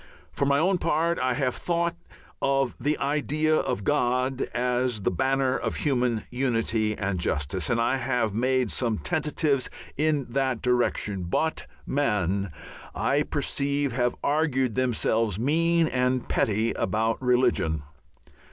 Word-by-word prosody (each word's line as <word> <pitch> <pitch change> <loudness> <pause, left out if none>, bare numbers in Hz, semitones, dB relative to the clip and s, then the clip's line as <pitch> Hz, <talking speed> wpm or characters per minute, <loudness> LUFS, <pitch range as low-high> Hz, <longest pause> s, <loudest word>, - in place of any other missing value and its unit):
For 140 - -1
my 140 0 +3
own 180 +4 +2
part 170 +2 +1
I 130 -1 +1
have 130 -4 0
thought 170 -1 -1 0.5
of 135 -2 +1
the 150 +1 0
idea 150 +2 +1
of 125 -7 -1
God 130 +1 +1
as 125 -2 0
the - - +1
banner 130 +6 +1
of - - -2
human 125 -6 0
unity 115 -4 0
and 95 -2 -2
justice, 75 +1 -2
and 115 - +1
I 120 +3 +2
have 120 -4 0
made 125 +1 +1
some 115 -4 0
tentatives 150 - 0 0.3
in 150 -2 +1
that 130 -2 0
direction, 120 -6 0
but 160 - -1 0.2
men, 100 -8 0 0.5
I 145 +2 +1
perceive, 140 -1 -1
have 125 0 0
argued 140 -5 +1
themselves 115 -4 +1
mean 165 +7 +2
and 125 -3 0
petty 110 +2 +1
about 110 +5 -1
religion. 125 - +2
130 Hz, 135 wpm, -26 LUFS, 115-145 Hz, 0.5 s, my